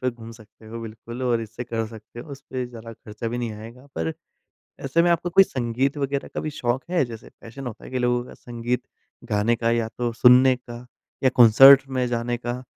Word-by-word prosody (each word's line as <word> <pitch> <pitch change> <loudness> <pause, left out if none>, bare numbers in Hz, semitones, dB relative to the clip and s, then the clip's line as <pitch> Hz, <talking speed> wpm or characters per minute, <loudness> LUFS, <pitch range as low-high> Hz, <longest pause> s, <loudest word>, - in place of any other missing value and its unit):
पे 130 - 0
घूम 115 -1 -12
सकते 110 0 -18
हो 115 +1 -7
बिल्कुल 115 +2 -8
और 120 -2 +1
इससे 115 +2 -7
कर 115 -1 -3
सकते 110 +1 -11
हो, 155 - -12
उसपे 135 -2 -6
ज़्यादा 115 -1 -10
खर्चा 110 +1 -7
भी 120 +2 -4
नहीं 120 -2 -3
आएगा 115 +5 -11
पर 80 0 -2 0.7
ऐसे 165 +5 +2
में 175 - +3
आपको 170 +1 0
कोई 195 +2 +6
संगीत 130 0 -2
वग़ैरह 140 0 -2
का - - -2
भी 155 - -4
शौक 120 +2 0
है, 175 -5 +2
जैसे 115 -3 -10
पैशन 120 +4 -10
होता 120 - -8
है - - -10
कि 130 - -2
लोगों 125 0 +1
का - - -13
संगीत 120 +1 -4 0.5
गाने 105 +3 +2
का 115 0 0
या 115 -1 0
तो 120 -1 -1
सुनने 130 +1 +7
का 120 0 -11 0.4
या - - +6
कॉन्सर्ट 130 +4 +9 0.2
में 125 - +1
जाने 120 0 -2
का 120 +1 -5
120 Hz, 215 wpm, -23 LUFS, 115-130 Hz, 0.7 s, कॉन्सर्ट